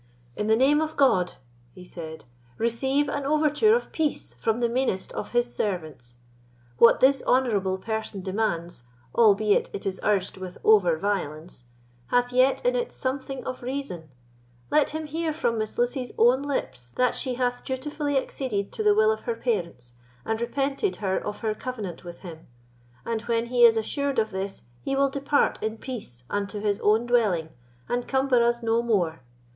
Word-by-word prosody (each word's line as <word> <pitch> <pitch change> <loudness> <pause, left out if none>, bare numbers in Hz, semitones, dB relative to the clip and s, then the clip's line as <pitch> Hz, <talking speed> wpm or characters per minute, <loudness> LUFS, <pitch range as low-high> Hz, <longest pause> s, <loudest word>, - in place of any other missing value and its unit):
"In 210 - -2
the 220 - +5
name 280 +5 +4
of 315 0 -3
God," 190 -11 +3 0.4
he 180 - -11
said, 160 -4 -8 0.3
"receive 265 +5 +1
an 285 0 -2
overture 305 +9 +3
of 485 - -3
peace 300 - -2
from 225 - 0
the 240 - +2
meanest 235 -6 -1
of 210 - -5
His 240 0 +2
servants. 155 - -4 0.6
What 235 - +6
this 270 +1 +5
honourable 205 -7 +2
person 220 -1 -4
demands, 175 - -2 0.3
albeit 210 -2 +4
it - - -6
is 190 -1 -2
urged 200 -3 0
with 185 -1 -8
over 185 -7 +5
violence, 160 -7 -3 0.4
hath 245 0 +1
yet 260 - +3
in - - +3
it - - -1
something 265 0 -4
of 255 - -5
reason. 245 - -5 0.6
Let 300 - +4
him 315 +1 -4
hear 320 +2 -2
from 240 -8 -1
Miss 215 0 -4
Lucy's 245 +1 -1
own 245 +4 +5
lips 130 - -3
that 250 -1 +2
she 255 -2 -2
hath 245 0 -1
dutifully 285 +2 -2
acceded 235 -7 -2
to - - -4
the 420 -1 +4
will 435 +1 +4
of 440 - -4
her 470 - -1
parents, 170 - -3 0.3
and 220 +1 -2
repenteth 275 - -1
her 190 -3 -1
of 210 0 -5
her 220 -2 0
covenant 215 -8 -6
with 175 -1 -10
him; 165 -4 -10 0.6
and 230 -1 -2
when 230 0 +1
he 245 -1 +5
is 225 -1 +6
assured 280 +5 -1
of 220 -1 +1
this 195 -4 -5 0.2
he 275 - -2
will 275 0 +3
depart 280 +1 +1
in 220 +1 -2
peace 210 - -6
unto 205 +3 -3
his 205 -1 0
own 220 +3 +3
dwelling, 210 -10 +2 0.4
and 245 0 -2
cumber 265 -3 +3
us 235 0 +1
no 230 +1 +2
more. 180 - 0
235 Hz, 175 wpm, -26 LUFS, 195-270 Hz, 0.6 s, What